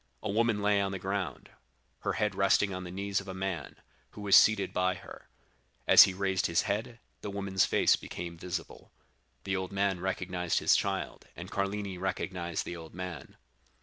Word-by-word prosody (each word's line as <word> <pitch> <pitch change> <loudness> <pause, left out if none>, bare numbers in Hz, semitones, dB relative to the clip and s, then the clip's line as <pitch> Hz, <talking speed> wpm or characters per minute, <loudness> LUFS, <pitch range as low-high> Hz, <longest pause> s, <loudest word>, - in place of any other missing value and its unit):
A - - -1
woman 110 -1 +1
lay 105 -1 +3
on 100 0 -1
the 95 - -3
ground, 95 0 -4 0.5
her - - -2
head - - 0
resting 100 -1 +2
on 90 0 -5
the - - -7
knees 100 +1 -2
of 95 - -14
a 95 - -6
man, 95 -2 -4 0.4
who 105 - -9
was 100 -1 +5
seated 110 -2 +5
by 90 0 +1
her; - - -12 0.6
as - - +10
he 95 - -3
raised 95 -1 0
his 85 - +2
head, 115 +3 -3 0.2
the 105 - -5
woman's 100 -1 +1
face - - +4
became 85 -1 -7
visible. 90 0 -6 0.5
The 95 0 -1
old 95 0 -3
man 100 -2 0
recognized 90 -1 -2
his - - +4
child, - - -2
and - - -9
Carlini 100 -1 -2
recognized 90 -2 -3
the 85 - -5
old 80 -1 -11
man. 90 -1 -7
95 Hz, 180 wpm, -30 LUFS, 90-100 Hz, 0.6 s, as